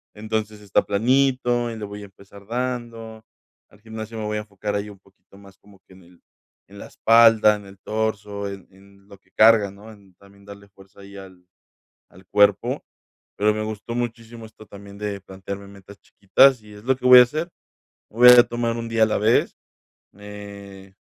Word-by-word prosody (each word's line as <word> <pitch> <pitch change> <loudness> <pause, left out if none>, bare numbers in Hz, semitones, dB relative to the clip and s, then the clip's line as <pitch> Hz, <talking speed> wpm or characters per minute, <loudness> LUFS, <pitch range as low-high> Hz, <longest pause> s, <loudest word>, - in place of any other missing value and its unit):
Entonces, 110 0 -5
está 100 -1 0
planito 120 +2 0
y - - -7
le 105 - -6
voy 105 0 -9
a - - -9
empezar 100 +1 -17
dando. 115 -2 -6 0.4
Al 105 - -23
gimnasio 110 0 -9
me 110 - -5
voy 105 0 -3
a - - -3
enfocar 105 0 -6
ahí 100 +1 -3
un 100 -2 -14
poquito 100 0 -24
más 100 -1 -18
como 100 -1 -22
que - - -19
en 95 0 -18
el 85 0 -23 0.5
en 100 - -15
la - - -9
espalda, 115 -2 +4
en 105 -1 -11
el 100 0 -16
torso, 105 -1 -4
en 100 -1 -10
en 100 +1 -22
lo 100 - -14
que - - -36
cargas, 110 -3 +4
¿no? 105 +3 -14
En 100 -3 -20
también 100 +1 -21
darle 100 0 -14
fuerza 95 0 -19
ahí 100 0 -13
al 95 -2 -14 0.6
al 95 +1 -19
cuerpo. 100 0 +1 0.5
Pero 105 +1 +1
me 110 - -3
gustó 110 +2 -7
muchísimo 115 -1 -6
esto 110 0 -17
también 100 0 -13
de 105 -1 -5
plantearme 100 +1 -9
metas 100 0 -16
chiquitas 125 +6 +3
y 105 - -16
es 105 - -15
lo 130 +1 +1
que 125 - -5
voy 125 0 +10
a - - +9
hacer. 155 +7 -5 0.6
Voy 120 +3 +4
a 125 -1 +9
tomar 120 -1 -3
1 115 0 -6
día 115 -1 +2
a - - +6
la 105 - -1
vez, 110 +3 +1 0.6
eh, 100 -1 -12
105 Hz, 195 wpm, -22 LUFS, 100-115 Hz, 0.6 s, voy